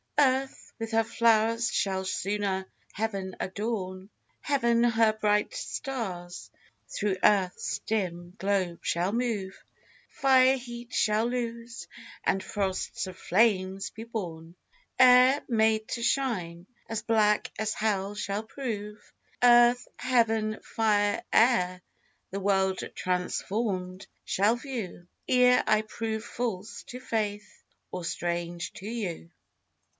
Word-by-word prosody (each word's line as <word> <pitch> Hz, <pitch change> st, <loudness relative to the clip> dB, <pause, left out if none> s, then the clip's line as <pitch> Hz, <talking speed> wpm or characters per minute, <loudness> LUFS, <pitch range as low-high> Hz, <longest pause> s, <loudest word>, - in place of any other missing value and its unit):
Earth 265 Hz, -2 st, +1 dB
with 225 Hz, 0 st, -4 dB
her 225 Hz, 0 st, +3 dB
flowers 230 Hz, 0 st, +2 dB
shall 190 Hz, -1 st, 0 dB
sooner 195 Hz, 0 st, -1 dB, 0.3 s
heaven 195 Hz, -3 st, -3 dB
adorn; 190 Hz, -2 st, -4 dB, 0.3 s
Heaven 235 Hz, -5 st, +2 dB
her 225 Hz, -2 st, +4 dB
bright 210 Hz, -1 st, +1 dB
stars 185 Hz, -10 st, -5 dB, 0.4 s
through 200 Hz, -2 st, -1 dB
earth's 190 Hz, -3 st, +2 dB
dim 175 Hz, -5 st, -2 dB
globe 190 Hz, -3 st, 0 dB
shall 175 Hz, +3 st, 0 dB
move; 220 Hz, -5 st, -2 dB, 0.5 s
Fire 265 Hz, -1 st, +4 dB
heat 240 Hz, -1 st, -9 dB
shall 215 Hz, +1 st, +2 dB
lose, 235 Hz, -5 st, -4 dB, 0.4 s
and 190 Hz, -, +1 dB
frosts 195 Hz, -2 st, -2 dB
of 185 Hz, 0 st, -9 dB
flames 195 Hz, -2 st, +1 dB
be 225 Hz, -, -8 dB
born; 175 Hz, -7 st, -6 dB, 0.4 s
Air, 255 Hz, +2 st, +7 dB
made 220 Hz, -2 st, +2 dB
to 235 Hz, -, -3 dB
shine, 185 Hz, -10 st, -1 dB, 0.2 s
as 220 Hz, -1 st, -3 dB
black 215 Hz, -2 st, +2 dB
as 215 Hz, -1 st, 0 dB
hell 205 Hz, -2 st, -1 dB
shall 205 Hz, 0 st, -3 dB
prove: 215 Hz, -4 st, -6 dB, 0.3 s
Earth, 240 Hz, 0 st, +6 dB
heaven, 225 Hz, -4 st, +1 dB
fire, 205 Hz, -2 st, +1 dB
air, 185 Hz, -6 st, +3 dB, 0.5 s
the 195 Hz, -, -3 dB
world 190 Hz, -1 st, +1 dB, 0.2 s
transformed 185 Hz, +1 st, -2 dB, 0.2 s
shall 205 Hz, +4 st, +2 dB
view, 235 Hz, -9 st, -6 dB, 0.2 s
Ere 250 Hz, 0 st, +5 dB
I 215 Hz, 0 st, +4 dB
prove 220 Hz, 0 st, -4 dB
false 225 Hz, -4 st, -4 dB
to 250 Hz, -, -8 dB
faith, 210 Hz, -4 st, -3 dB, 0.3 s
or 180 Hz, -, -5 dB
strange 170 Hz, 0 st, -3 dB
to 195 Hz, -, -9 dB
you. 200 Hz, -8 st, -4 dB
215 Hz, 115 wpm, -28 LUFS, 190-235 Hz, 0.5 s, Air